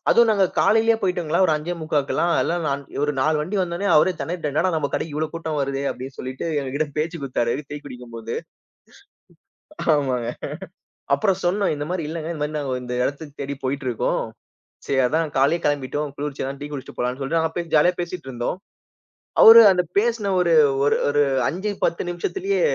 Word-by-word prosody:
அதுவும் 235 -1 +5
நாங்க 200 -3 +3
காலையிலே 225 +1 +4
போயிட்டோங்களா, 180 -4 0
ஒரு - - +2
5-3/4லாம் 155 0 -1
எல்லாம். 175 +1 -1
நான், 140 0 -1
இவரு 145 +1 0
4 155 +3 +2
வண்டி 180 +7 -3
வந்தோன்னே 180 +2 -2
அவரே 155 +5 +5
தெணறிட்டாரு, 165 -4 -3
என்னடா! 170 +6 +2
நம்ம 150 -3 0
கடைக்கு 155 -2 -3
இவ்ளோ 155 +1 0
கூட்டம் 160 -2 -3
வருதே 135 0 -2
அப்டி 130 - -6
சொல்லிட்டு 130 +1 -5 0.2
எங்ககிட்ட 140 +3 -2
பேச்சு 165 +3 -1
குடுத்தாரு, 120 -3 0 0.2
டீ 145 - -4
குடிக்கும் 125 -3 -10
போது. 115 0 -5 1.6
ஆமாங்க, 130 -5 -1 0.9
அப்புறம் 185 +6 +1
சொன்னோம், 195 +3 +1
இந்த 145 0 -4
மாரி 180 -4 -2
இல்லங்க, 160 0 -5
இந்த 155 - -7
மாரி 150 +1 -3
நாங்க 135 -3 -2
இந்த 125 0 -5
எடத்துக்கு 145 0 -6
தேடி 140 0 -4
போய்ட்டிருக்கோம். 130 -3 -1 0.7
சரி 135 - +1
அதான் 155 +2 -1
காலையிலேயே 145 +6 +2
கெளம்பிட்டோம், 145 0 -1
குளிர்ச்சியா 145 -2 -4
அதான் 135 0 -6
டீ 145 - -4
குடிச்சிட்டு 135 -2 -8
போலான்னு 125 +2 -1
சொல்லிட்டு 135 +5 0
நாங்க 160 0 -1
பேசி 170 -2 -4
ஜாலியா 175 +4 +5
பேசிட்டு 175 -4 -6
இருந்தோம். 120 +7 -3 0.9
அவரு 230 +1 +11
அந்த 180 -1 +2 0.2
பேசின 225 -2 0
ஒரு 175 -1 +2 0.3
ஒரு 145 - +3
ஒரு 145 0 +3 0.3
5 190 +5 -3
10 170 - -1
நிமிஷத்துலே 385 - -2
150 Hz, 170 wpm, -22 LUFS, 140-175 Hz, 1.6 s, அவரு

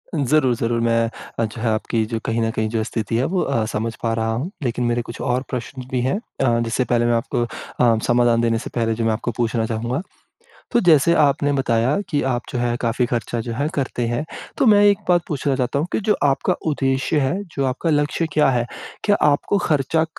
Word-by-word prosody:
ज़रूर, 140 -2 +2
ज़रूर। 115 0 -1
मैं 115 0 +2 0.3
अच्छा 115 +1 -2
आपकी 110 +1 -1
जो 115 0 -3
कहीं 115 +1 0
न 115 - +1
कहीं 110 -1 -1
जो 110 0 -1
स्थिति 110 0 -3
है 125 - +1
वो 185 - +2
अ, 115 -6 0
समझ 110 +1 -3
पा 115 -1 +1
रहा 115 0 -1
हूँ। 145 - -3
लेकिन 120 0 -1
मेरे 120 0 +1
कुछ 115 0 -8
और 125 +1 0
प्रश्न 130 +1 -5
भी 125 -1 0
है, 130 +8 0 0.3
अ, 120 -3 +3
जिससे 120 +3 0
पहले 120 0 +1
मैं 120 - +2
आपको 120 +1 0
अ, 115 0 0
समाधान 120 -1 +3
देने 115 -1 +2
से - - -7
पहले 115 -2 +1
जो 115 0 -2
मैं 110 - +2
आपको 120 +2 -2
पूछना 115 -1 0
चाहूँगा। 120 +6 -2 0.7
तो 240 - +4
जैसे 170 - +5
आपने 145 0 +2
बताया 130 +3 +1
कि 145 -3 +1
आप 125 -2 0
जो 125 - -2
है 120 -1 0
काफ़ी 120 +1 +1
ख़र्चा 120 0 -2
जो 115 - -2
है 140 +6 -1
करते 125 -4 -1
हैं। 120 +6 -1 0.3
तो - - +3
मैं 205 -2 +6
एक 205 -1 +5
बात 175 -1 +5
पूछना 140 -2 -1
चाहता 130 +2 -1
हूँ 160 - -1
कि - - 0
जो 210 +1 +2
आपका 145 +6 +2
उद्देश्य 135 +1 +1
है, 135 +3 +1
जो 140 -7 -3
आपका 130 +6 -1
लक्ष्य 150 +2 +1
क्या 150 -3 +4
है? 120 -2 +1 0.4
क्या 205 -1 +3 0.2
आपको 170 +7 +1
ख़र्चा 160 -1 +1
125 Hz, 220 wpm, -21 LUFS, 115-145 Hz, 0.7 s, मैं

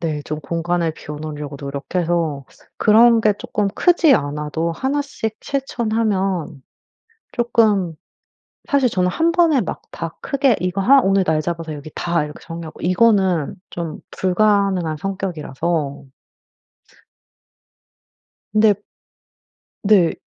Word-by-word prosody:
네. 155 -3 -2
좀 155 0 -4
공간을 170 +2 -1
비워 150 -1 -8
놓으려고 150 -2 -6
노력해서. 155 +1 -2 0.3
그런 230 +2 +6
게 215 -1 +3
쪼끔 205 -1 -1
크지 345 -5 +4
않아도 150 - -2
1 270 - -1
씩 220 -6 -5
실천하면 210 - -1 0.7
쪼끔 215 -8 +2 0.7
사실 280 -5 +3
저는 180 -3 +1
1 330 - +1
번에 330 -6 +4
막 - - -5
다 - - -6
크게 275 -5 +2
이거 180 +2 -1
하 275 +7 +6
오늘 195 -4 +2
날 155 -2 +1
잡아서 165 0 -4
여기 150 +2 -9
다 170 -3 0
이렇게 150 - -9
정리하고. 165 -1 -8
이거는 185 -4 +2 0.2
좀 165 -3 -5
불가능한 190 -4 +1
성격이라서 165 -6 -3 2.5
근데 215 -1 +5 1.1
네. 195 -5 +4
180 Hz, 230 characters per minute, -20 LUFS, 160-220 Hz, 2.5 s, 그런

